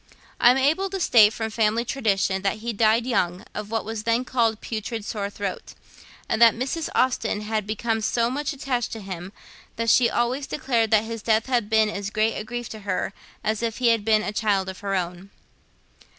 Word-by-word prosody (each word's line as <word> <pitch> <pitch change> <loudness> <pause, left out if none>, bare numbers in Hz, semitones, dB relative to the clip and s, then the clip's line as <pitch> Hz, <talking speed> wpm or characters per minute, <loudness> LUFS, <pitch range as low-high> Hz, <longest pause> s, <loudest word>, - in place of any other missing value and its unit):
I 240 - +7
am 250 - +4
able 315 +9 +2
to 385 0 -4
state, 220 - +6
from 220 0 -4
family 220 +2 +1
tradition, 200 -7 0
that 195 +2 0
he 230 +2 -4
died 220 +2 +3
young, 185 -6 -1
of 210 -1 -6
what 225 0 -2
was 225 0 -4
then 230 +3 0
called 230 -4 +1
putrid 225 -1 -5
sore 200 -2 -3
throat; 200 -2 -6 0.5
and 220 - -1
that 230 -1 +7
Mrs. 270 +7 -3
Austen 230 -4 +1
had 215 -1 -2
become 220 +1 -1
so 230 +2 +1
much 290 +3 -2
attached 265 -4 -2
to 225 - -6
him 190 -2 -7 0.4
that 230 -1 +1
she 240 -2 +5
always 255 +4 -1
declared 235 -6 0
that 215 0 +4
his 225 0 -6
death 220 0 +2
had 240 -5 0
been 220 -1 +4
as 200 -1 -4
great 215 +1 +1
a - - -4
grief 240 +1 -5
to 220 - -8
her 195 -1 -2 0.3
as 215 0 -1
if 230 -1 -2
he 245 -2 +3
had 230 -2 +2
been 215 0 +3
a 210 - -3
child 200 -3 0
of 190 - -8
her 200 -1 -2
own. 180 +1 -4
220 Hz, 210 wpm, -24 LUFS, 210-235 Hz, 0.5 s, I